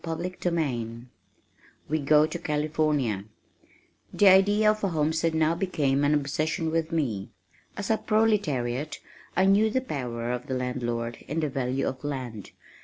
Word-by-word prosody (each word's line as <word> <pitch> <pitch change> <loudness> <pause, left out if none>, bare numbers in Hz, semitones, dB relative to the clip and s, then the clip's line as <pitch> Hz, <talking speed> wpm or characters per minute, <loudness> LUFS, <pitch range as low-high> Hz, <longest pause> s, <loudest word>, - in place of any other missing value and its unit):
CHAPTER 165 0 -3 0.3
XXXIV 120 -8 -2 0.8
We 155 +1 0
Go 150 +1 +5
to 160 +2 -5
California 150 -9 0 0.9
The 205 - +5
idea 205 +3 +5
of 215 0 -5
a - - +3
homestead 160 0 0
now 160 0 +3
became 150 -6 0
an 145 +1 +3
obsession 155 +3 -1
with 165 0 -1
me. 120 -12 -1 0.5
As 205 +1 -2
a 220 - +2
proletariat 155 - 0 0.4
I 190 - +4
knew 205 +3 +4
the 260 - +1
power 125 - -4
of 125 0 -4
the 130 - -2
landlord 120 -2 -3
and 160 +3 -2
the 150 - 0
value 130 0 -1
of 130 +1 -5
land. 125 -8 -5
150 Hz, 150 wpm, -27 LUFS, 125-170 Hz, 0.9 s, Go